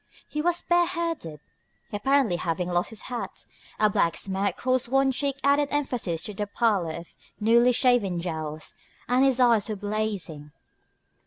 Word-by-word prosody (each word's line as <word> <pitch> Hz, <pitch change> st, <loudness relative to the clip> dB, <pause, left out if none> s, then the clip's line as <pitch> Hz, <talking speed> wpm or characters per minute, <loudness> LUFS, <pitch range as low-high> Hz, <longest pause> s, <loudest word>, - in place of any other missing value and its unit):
He 300 Hz, -, -3 dB
was 345 Hz, +1 st, +1 dB
bareheaded, 335 Hz, -, 0 dB, 0.5 s
apparently 250 Hz, -2 st, +2 dB
having 175 Hz, +1 st, -2 dB
lost 175 Hz, 0 st, 0 dB
his 225 Hz, -, -6 dB
hat; 245 Hz, -2 st, -6 dB, 0.3 s
a 215 Hz, -, +5 dB
black 170 Hz, -5 st, +1 dB
smear 195 Hz, 0 st, -1 dB
across 255 Hz, +3 st, 0 dB
one 270 Hz, +1 st, +3 dB
cheek 275 Hz, +1 st, -1 dB
added 285 Hz, +1 st, +3 dB
emphasis 250 Hz, -, -2 dB
to 210 Hz, -, -4 dB
the 205 Hz, +1 st, -3 dB
pallor 200 Hz, -7 st, +1 dB
of 170 Hz, 0 st, -10 dB, 0.2 s
newly 235 Hz, +3 st, +5 dB
shaven 240 Hz, -8 st, +2 dB
jowls; 155 Hz, -3 st, -5 dB, 0.3 s
and 250 Hz, +2 st, +3 dB
his 265 Hz, -2 st, +3 dB
eyes 230 Hz, -4 st, +4 dB
were 215 Hz, -, -2 dB
blazing. 200 Hz, -8 st, -4 dB
220 Hz, 150 wpm, -26 LUFS, 180-265 Hz, 0.5 s, a